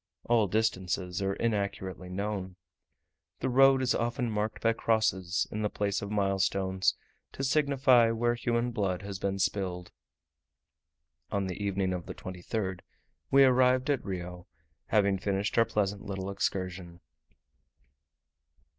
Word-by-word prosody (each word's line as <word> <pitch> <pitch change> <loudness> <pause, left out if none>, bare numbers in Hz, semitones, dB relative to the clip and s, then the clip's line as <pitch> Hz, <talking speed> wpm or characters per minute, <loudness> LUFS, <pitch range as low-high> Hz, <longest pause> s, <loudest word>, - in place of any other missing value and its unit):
All 115 -3 +3
distances 95 -3 -1
are 95 0 0
inaccurately 100 -4 -2
known. 95 -1 -4 0.8
The - - -1
road 135 +1 +5
is 125 - +2
often 120 0 -1
marked 105 +1 -2
by 115 0 +4
crosses, 105 -5 +1
in 105 - -3
the 105 - 0
place 100 -1 -1
of 100 - -5
milestones, 95 -2 +1 0.4
to 135 - -5
signify 135 -4 +4
where 120 +1 +1
human 120 0 -1
blood 100 -5 -1
has 100 -1 -6
been 100 0 -1
spilled. 95 -2 -2 1.4
On 100 -1 -1
the 95 +2 -4
evening 95 -2 0
of 90 -2 -5
the - - -6
23rd 95 +1 -4 0.5
we 135 0 +6
arrived 130 +1 +4
at 140 - -1
Rio, 90 -2 -6 0.4
having 100 -3 +2
finished 100 +1 -1
our 115 - +5
pleasant 105 -3 -1
little 95 -1 -4
excursion. 90 -3 -3
100 Hz, 130 wpm, -29 LUFS, 95-115 Hz, 1.4 s, we